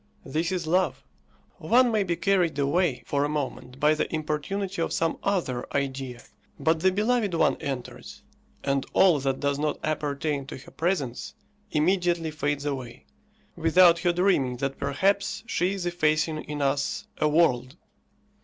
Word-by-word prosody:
This 160 +5 -1
is 180 -3 -2
love; 180 +2 +1 0.6
one 240 +8 +4
may 215 -2 +2
be 175 -3 -1
carried 175 -3 +1
away 145 0 +1
for 140 0 0
a 145 - 0
moment 135 -3 -4
by 150 +1 +4
the 155 - -2
importunity 165 +5 -2
of - - -1
some 165 0 0
other 175 -11 -1
idea, 135 -3 -3 0.4
but 160 0 +2
the 190 +3 +3
beloved 210 -1 +1
one 165 - +3
enters, 135 -3 -6 0.4
and 140 -1 0
all 180 -6 +5
that 135 -1 -1
does 140 0 0
not 150 0 -1
appertain 145 -2 -2
to - - -7
her 130 - -14
presence 160 -8 -2 0.3
immediately 170 0 +1
fades 145 -1 -2
away, 130 -4 -5 0.5
without 170 +1 +5
her 175 0 +2
dreaming 170 -9 +1
that 135 +1 -3
perhaps 195 +10 0
she 185 -3 0
is 190 -3 -4
effacing 155 -2 0
in 150 -1 -3
us 140 0 -1
a 155 - +3
world. 130 -6 +2
155 Hz, 155 wpm, -26 LUFS, 140-180 Hz, 0.6 s, all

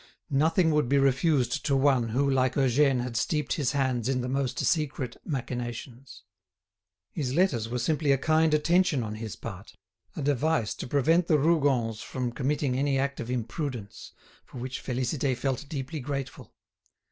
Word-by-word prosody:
Nothing 160 +4 +3
would 150 -5 +1
be 140 - +3
refused 135 -1 +2
to 140 - +2
one 135 -4 +3
who 135 +5 +1
like 130 -2 +2
Eugène 135 -1 +3
had 125 -2 -5
steeped 150 +5 0
his 140 -3 0
hands 130 -4 0
in 130 -1 0
the 125 - -3
most 135 0 -1
secret 135 -6 -1
machinations. 125 -2 -5 0.9
His 135 -5 -3
letters 135 - +2
were 125 - -2
simply 150 +4 +1
a 135 - +4
kind 155 +3 +2
attention 170 -3 +2
on 105 -1 -4
his 110 -1 -6
part, 100 +2 -9 0.4
a 150 - -4
device 145 -3 +1
to - - -5
prevent 160 +6 +2
the 155 - +4
Rougons 135 -8 +1
from 125 -2 -3
committing 135 +1 -1
any 135 +1 +1
act 140 +1 -1
of 115 - -5
imprudence, 125 -2 -4 0.3
for - - -13
which 130 +2 -5
Félicité 130 +1 -1
felt 135 +2 -2
deeply 150 +2 -4
grateful. 135 -2 -5
135 Hz, 160 wpm, -27 LUFS, 125-150 Hz, 0.9 s, a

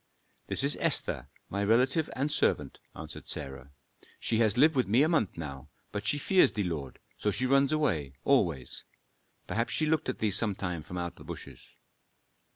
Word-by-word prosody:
"This - - +2
is 140 +1 +3
Esther, - - +2 0.2
my 100 +1 -2
relative 130 +9 +3
and 140 +3 -1
servant," - - 0 0.2
answered - - -9
Sarah. 65 0 -6 0.5
"She 115 - 0
has 110 -1 +3
lived 155 +4 +5
with 130 - +2
me 115 +8 +4
a - - +3
month 155 - +1
now, 70 -5 -7 0.2
but 105 0 -4
she 145 - +2
fears 185 +6 +4
thee, 105 - -1
lord, 75 -7 -4 0.2
so 105 - +1
she 125 +5 -1
runs 135 +1 +4
away 80 - 0
always. 85 - +1 0.6
Perhaps 115 +1 -1
she 155 - +1
looked 155 -3 +1
at 130 - -2
thee 110 -2 0
sometime 95 -5 -1
from 90 +4 -8
out 85 -1 -4
the - - -12
bushes." - - -8
110 Hz, 175 wpm, -30 LUFS, 85-140 Hz, 0.6 s, lived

